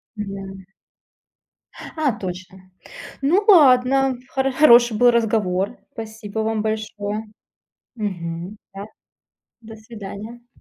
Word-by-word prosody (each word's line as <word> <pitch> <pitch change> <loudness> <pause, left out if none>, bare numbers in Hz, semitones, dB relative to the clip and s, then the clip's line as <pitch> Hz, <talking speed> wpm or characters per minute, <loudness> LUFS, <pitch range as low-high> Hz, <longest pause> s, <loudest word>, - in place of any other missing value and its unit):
Да. 195 -2 -7 1.1
Ха, 295 -8 -3
точно. 185 0 -7 0.6
Ну 360 +9 +2
ладно, 270 -5 +5
хоро 270 0 -1
хороший 240 -5 +5
был 245 +2 +5
разговор. 215 -3 0
Спасибо 220 -1 -7
вам 220 -1 -1
большое. 215 -1 -4 0.7
Мгм. 180 -2 -5 0.2
Да, 200 +1 -7 0.8
до 225 -1 -12
свидания. 220 +2 -10
220 Hz, 90 wpm, -21 LUFS, 200-245 Hz, 1.1 s, ладно